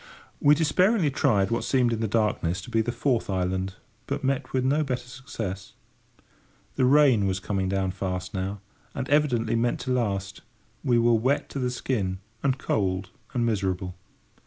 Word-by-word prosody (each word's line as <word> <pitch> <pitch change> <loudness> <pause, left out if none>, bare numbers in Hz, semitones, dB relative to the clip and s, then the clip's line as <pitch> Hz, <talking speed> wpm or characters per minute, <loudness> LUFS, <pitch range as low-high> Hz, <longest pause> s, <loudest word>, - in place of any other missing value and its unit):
We 145 +1 +6
despairingly 170 +2 +3
tried 110 -9 +2
what 115 - 0
seemed 125 -3 +2
in 110 - -2
the 110 - 0
darkness 100 -5 0
to 120 - -10
be 115 -1 +3
the 115 +2 -1
fourth 120 -1 0
island, 95 0 -1 0.3
but - - -3
met 135 0 -1
with 130 -1 0
no 145 +4 +2
better 125 -3 -3
success. 110 -7 -6 1.0
The 130 - +3
rain 130 -7 +5
was 95 0 -1
coming 95 -1 -1
down 95 -1 0
fast 90 -1 -4
now, 95 +1 -3 0.3
and 135 -1 -3
evidently 145 -7 +2
meant 120 +1 +1
to 130 - -3
last. 100 -5 -1 0.4
We 125 -4 +3
were 120 0 +4
wet 130 +6 +1
to 140 - -4
the 125 -1 0
skin, 105 -7 -2 0.2
and 135 -1 +1
cold 95 -6 -1 0.2
and 120 -1 +2
miserable. 95 -4 -1
115 Hz, 170 wpm, -26 LUFS, 95-130 Hz, 1.0 s, We